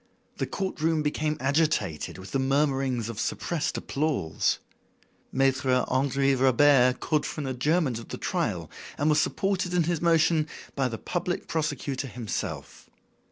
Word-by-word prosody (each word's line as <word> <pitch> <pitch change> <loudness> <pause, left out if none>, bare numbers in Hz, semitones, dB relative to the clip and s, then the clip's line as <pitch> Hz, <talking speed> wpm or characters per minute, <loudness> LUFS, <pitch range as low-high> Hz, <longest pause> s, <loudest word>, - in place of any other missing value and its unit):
The - - -1
court 190 -5 -4
room 160 -1 +2
became 150 +1 -1
agitated 140 - 0
with 95 +1 -10
the 135 - 0
murmurings 135 -3 +1
of 115 -3 -6
suppressed 170 +5 -2
applause. 135 - 0 0.7
Maitre 130 -1 +2
Henri 135 +1 +2
Robert 130 0 +4
called 155 -2 0
for 155 - -4
an - - -4
adjournment 130 0 +1
of 115 - -10
the - - -6
trial - - -2 0.3
and 145 +2 +2
was 150 0 +4
supported 190 -2 0
in 175 - +4
his 170 0 -1
motion 165 -2 +3 0.3
by 135 -2 +1
the 115 -2 -4
public 175 +4 -3
prosecutor 145 -4 -2
himself. 115 -3 -5
140 Hz, 145 wpm, -27 LUFS, 130-155 Hz, 0.7 s, Robert